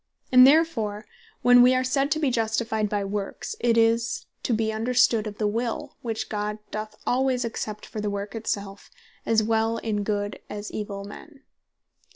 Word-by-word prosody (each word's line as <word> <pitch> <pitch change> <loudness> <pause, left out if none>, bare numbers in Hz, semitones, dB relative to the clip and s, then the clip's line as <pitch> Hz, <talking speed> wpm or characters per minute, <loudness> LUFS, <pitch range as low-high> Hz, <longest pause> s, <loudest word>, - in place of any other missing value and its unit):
And 255 0 +9
therefore 230 -9 +2 0.4
when 245 0 +7
wee 250 +1 +6
are 255 - +2
said 275 +2 +1
to 310 +1 +1
be 290 -4 +1
Justified 220 -2 0
by 205 -1 -1
Works, 205 - -4
it 235 -1 +2
is 230 +1 +2 0.2
to - - -2
be 220 -1 +1
understood 225 -1 +2
of 210 -1 -7
the 215 - -1
Will, 230 +2 -2
which 225 -2 -3
God 210 0 -3
doth 215 0 -5
alwaies 255 -1 +1
accept 215 -2 -5
for 215 - -6
the 210 - -1
Work 200 0 -4
it 225 -1 -7
selfe, 200 -1 -4 0.4
as 220 -1 +3
well 225 +1 +1
in 215 -2 -2
good, 205 0 -2
as 210 0 -6
in - - -5
evill 200 -1 -5
men. 270 +8 -12
220 Hz, 185 wpm, -25 LUFS, 210-245 Hz, 0.4 s, And